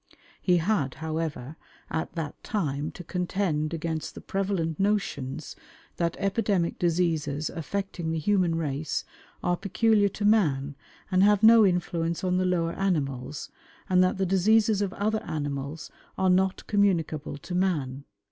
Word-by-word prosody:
He 180 -2 +3
had, 165 -7 0
however, 160 -3 -4 0.3
at 160 - -2
that 160 -4 -5
time 150 -8 -2
to 180 - -9
contend 175 -3 -1
against 160 -1 -3
the - - -8
prevalent 190 -5 -2
notions 160 -9 -1 0.4
that 170 -1 0
epidemic 195 -3 0
diseases 160 -4 0
affecting 175 0 -4
the 165 - -1
human 180 0 +2
race 150 -2 -2 0.4
are 175 - +2
peculiar 205 +2 +2
to 205 +2 -4
man 145 -10 +2 0.4
and 185 0 +4
have 205 +1 +4
no 225 0 +8
influence 170 -2 -1
on 180 -1 +1
the 185 - +1
lower 170 -2 +1
animals, 145 -7 -2 0.4
and 185 0 +4
that 185 - +1
the 190 - +1
diseases 205 +3 +3
of 200 -2 0
other 215 +2 0
animals 145 0 -4 0.3
are 190 -1 +3
not 190 +1 +1
communicable 165 -8 +1
to 170 +5 -8
man. 150 -8 0
175 Hz, 140 wpm, -27 LUFS, 155-195 Hz, 0.4 s, no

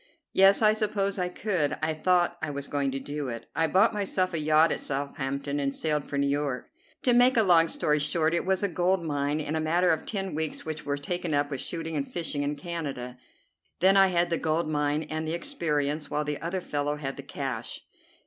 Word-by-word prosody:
"Yes, 195 +3 +6
I 215 0 +6
suppose 205 -2 -1
I 180 0 0
could. 180 -6 -1
I 160 0 +1
thought 175 +2 +2
I 155 - -2
was 140 -1 -5
going 140 -1 0
to 135 0 -3
do 145 0 -4
it. 115 -1 -6
I 165 - +2
bought 195 +7 +4
myself 190 -3 0
a 165 - 0
yacht 155 +1 +4
at - - -1
Southampton 140 0 -3
and 140 -1 -1
sailed 150 -2 -1
for 140 - -4
New 140 - +2
York. 140 -2 -2 0.3
To 250 - +4
make 245 +1 +5
a 225 - +6
long 170 -4 +5
story 150 -2 +1
short, 155 +2 +1
it 170 - +1
was 190 +1 0
a - - +3
gold 180 0 +1
mine 145 -1 -1
and 155 +1 -2
a - - +1
matter 170 +3 +2
of 160 - -1
ten 195 -3 -3
weeks 155 +1 -2
which 155 -2 -5
were 145 0 0
taken 170 +2 -2
up 145 0 0
with 135 - -2
shooting 165 -1 -3
and 140 -2 -3
fishing 160 -4 -2
in 145 +1 -1
Canada. 140 -6 -5 0.6
Then 190 +2 +5
I 195 -1 +7
had 175 -1 +1
the 165 - +1
gold 160 +1 0
mine 150 0 0
and 155 0 -4
the 160 - -2
experience, 150 - -1
while 150 - -1
the 150 -1 -3
other 175 +3 -2
fellow 145 -2 -2
had 135 -2 -5
the - - -7
cash. 130 -5 -4
155 Hz, 225 wpm, -27 LUFS, 145-180 Hz, 0.6 s, I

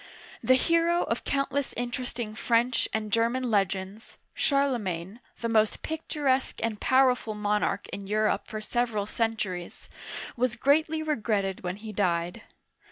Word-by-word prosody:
The 255 - +6
hero 335 +5 +3
of - - -2
countless 275 0 0
interesting 240 -2 -3
French 235 +2 +1
and 215 -1 -2
German 235 +3 +1
legends, 195 +1 -1 0.2
Charlemagne, 225 - 0 0.2
the 230 - 0
most 220 -2 +2
picturesque 290 -4 -1
and 220 -2 -2
powerful 255 -4 +3
monarch 210 0 0
in 200 -1 -6
Europe 215 +1 +1
for 215 -2 -5
several 225 -2 -1
centuries, 205 -6 -3 0.5
was 245 0 +1
greatly 310 +5 +2
re 305 -1 0
gretted 200 -4 -1
when 180 0 -2
he 215 +1 -8
died. 175 -3 0
230 Hz, 130 wpm, -28 LUFS, 205-260 Hz, 0.5 s, The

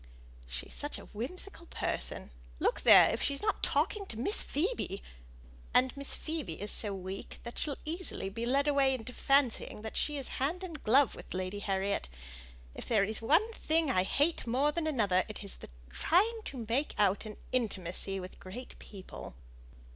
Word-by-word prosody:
"She's 60 0 -4
such 290 0 -4
a - - -10
whimsical 335 - -6
person; - - -3 0.3
look - - +1
there, - - +9
if - - -2
she's 280 +4 0
not 420 - +1
talking 400 -2 +1
to 220 - -7
Miss 350 - +1
Phoebe; 300 - -1 0.7
and 255 0 +4
Miss 280 0 -3
Phoebe 310 - -4
is 205 +1 -2
so 210 - -1
weak 190 0 -6 0.2
she'll 290 -3 -1
be 310 - -1
easily 335 - -3
led 245 +7 +1
away 275 -2 +4
into 250 0 -7
fancying 260 -6 +2
she 295 -1 0
is 270 - 0
hand 335 +7 0
and 330 -5 -7
glove 265 +4 +5
with - - -8
Lady 185 +2 -2
Harriet. 195 - -1 0.6
If - - -7
there 215 -4 +4
is 215 +2 -3
one 330 - +3
thing 320 -6 +2
I 185 - +4
hate 285 - +2
more 265 +6 +3
than 315 +1 -1
another, 205 -11 +3
it 215 - -7
is 200 - -4
the - - -11 0.2
trying 430 - +3
to 250 -5 -5
make 265 +6 0
out 205 +1 +2
an 210 - -8
intimacy 195 -5 -1
with 185 0 -8
great 240 +7 -9
people." 190 - -9
250 Hz, 170 wpm, -32 LUFS, 200-300 Hz, 0.7 s, there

